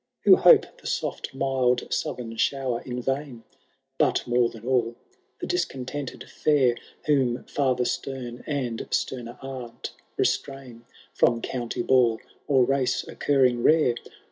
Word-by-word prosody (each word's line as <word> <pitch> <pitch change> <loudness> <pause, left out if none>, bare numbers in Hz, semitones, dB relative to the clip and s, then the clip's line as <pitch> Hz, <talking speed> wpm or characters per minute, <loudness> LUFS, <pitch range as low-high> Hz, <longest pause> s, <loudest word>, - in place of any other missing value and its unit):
Who - - +8
hope - - +7 0.2
the - - -8
soft - - -3
mild 130 -2 0
southern 115 -2 -3
shower 130 -2 0
in 125 -1 -5
vain; 135 -3 -3 0.6
But, - - +2
more 120 -1 +2
than 115 0 -12
all, 120 -2 +1 0.4
the - - -4
discontented 140 - -3
fidr. 135 -5 +1 0.3
Whom 130 -5 +1
fiither 130 -3 0
stem, 125 -3 -4
and 130 -6 -3
stemer 120 -1 -3
aunt, 130 -3 -7 0.3
restrain 130 -4 -2 0.3
From 120 - +3
county 120 0 -3
ball, 120 -4 +3 0.3
or 135 -4 +4
race 135 -1 0
occurring 130 -4 +2
rare. 155 -3 +4
125 Hz, 125 wpm, -25 LUFS, 120-135 Hz, 0.6 s, Who